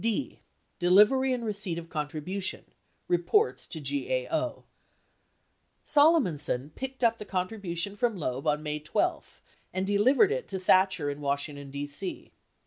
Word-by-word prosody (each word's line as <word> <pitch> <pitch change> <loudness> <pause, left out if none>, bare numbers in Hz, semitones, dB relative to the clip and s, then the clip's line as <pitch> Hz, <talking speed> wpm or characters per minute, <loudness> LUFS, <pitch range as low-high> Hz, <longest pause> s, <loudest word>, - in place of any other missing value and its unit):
D. 230 +5 -1 0.4
Delivery 210 +9 +5
and 245 -2 -2
Receipt 200 -5 -2
or 170 - -4
Contribution 165 +4 -3 0.2
— - - -43
Reports 420 - +1
to 160 - -6
GAO - - -2 1.2
Solomonson 215 - +2
picked 265 -1 -6
up 230 -1 +3
the - - -4
contribution 190 -1 -2
from 230 -1 0
Loeb 135 -3 -3
on 150 0 +1
May 150 0 -3
12 150 +1 -2 0.3
and 185 +1 -2
delivered 250 - +4
it 485 +1 -2
to 190 - -4
Thatcher 185 -5 +3
in 145 +1 -8
Washington, 140 0 -2
D.C. 145 +6 -6
185 Hz, 135 wpm, -28 LUFS, 150-235 Hz, 1.2 s, Delivery